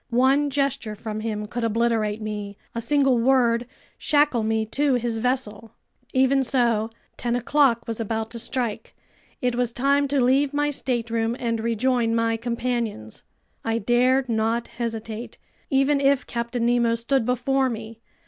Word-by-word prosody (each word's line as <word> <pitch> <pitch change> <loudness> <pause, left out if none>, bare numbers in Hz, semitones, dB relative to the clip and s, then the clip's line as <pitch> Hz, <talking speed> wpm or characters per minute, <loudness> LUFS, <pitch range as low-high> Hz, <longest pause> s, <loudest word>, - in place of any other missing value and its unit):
One 265 +4 +3
gesture 275 -6 -1
from 215 0 -5
him 215 -1 -3
could 240 +3 -4
obliterate 225 -1 0
me, 205 -1 -5 0.2
a 230 - -3
single 270 0 +2
word 240 -1 +3 0.3
shackle 290 -5 +2
me 220 0 0
to 275 +4 +1
his 235 -2 -1
vessel! 230 -3 -2 0.4
Even 265 +1 +3
so, 235 -4 +1 0.3
ten 240 0 -1
o'clock 245 -1 +2
was 230 -1 -3
about 225 0 -3
to 235 - -5
strike. 240 -1 -3 0.5
It 250 -1 +1
was 245 -1 0
time 280 +3 +2
to 280 0 +1
leave 270 +3 +2
my 295 0 +1
stateroom 230 -4 -1
and 230 -2 -1
rejoin 235 +1 +1
my 230 0 +1
companions. 235 - -3 0.4
I 225 0 0
dared 250 +4 +2
not 225 0 0
hesitate, 225 -1 -5 0.3
even 275 +1 +2
if 275 -1 +3
Captain 235 0 -2
Nemo 235 -1 +2
stood 235 +2 0
before 255 +2 +1
me. 225 -1 -7
235 Hz, 150 wpm, -24 LUFS, 225-260 Hz, 0.5 s, One